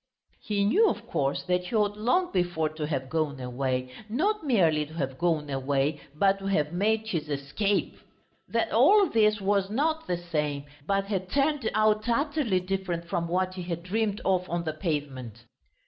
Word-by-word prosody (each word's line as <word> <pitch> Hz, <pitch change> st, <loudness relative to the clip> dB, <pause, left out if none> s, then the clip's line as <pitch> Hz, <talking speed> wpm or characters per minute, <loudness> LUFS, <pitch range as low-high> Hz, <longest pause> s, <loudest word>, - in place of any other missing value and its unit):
He 205 Hz, -1 st, 0 dB
knew, 420 Hz, -, +4 dB
of -, -, -4 dB
course, 140 Hz, 0 st, -1 dB
that 180 Hz, 0 st, 0 dB
he 225 Hz, -, -4 dB
ought 205 Hz, -1 st, +2 dB
long 250 Hz, -, +1 dB
before 175 Hz, -4 st, 0 dB
to 155 Hz, -1 st, -4 dB
have 135 Hz, -4 st, -2 dB
gone 155 Hz, -2 st, -1 dB
away, 125 Hz, 0 st, -2 dB, 0.2 s
not 390 Hz, -, 0 dB
merely 170 Hz, -, +3 dB
to 160 Hz, -, -12 dB
have 135 Hz, -5 st, -3 dB
gone 165 Hz, -4 st, +1 dB
away 140 Hz, +2 st, 0 dB
but 195 Hz, +4 st, +3 dB
to 195 Hz, -, -5 dB
have 150 Hz, -5 st, +1 dB
made 215 Hz, +4 st, +1 dB
his 160 Hz, -6 st, -2 dB
escape. 150 Hz, +9 st, -1 dB, 0.5 s
That -, -, 0 dB
all 410 Hz, -2 st, +6 dB
this 215 Hz, -1 st, +3 dB
was 195 Hz, 0 st, +1 dB
not 315 Hz, +8 st, 0 dB
the 175 Hz, -, 0 dB
same, 150 Hz, -5 st, -2 dB, 0.2 s
but 195 Hz, 0 st, +1 dB
had 190 Hz, -2 st, -3 dB
turned 280 Hz, -1 st, +1 dB
out 215 Hz, +1 st, +2 dB
utterly 280 Hz, -5 st, +1 dB
different 180 Hz, -2 st, -3 dB
from 175 Hz, -2 st, -1 dB
what 185 Hz, +2 st, 0 dB
he 185 Hz, -, -6 dB
had 170 Hz, -1 st, -4 dB
dreamed 210 Hz, +3 st, -1 dB
of 185 Hz, -1 st, +1 dB
on 170 Hz, 0 st, -1 dB
the 155 Hz, -2 st, -2 dB
pavement. 135 Hz, -, -4 dB
180 Hz, 180 wpm, -27 LUFS, 150-215 Hz, 0.5 s, all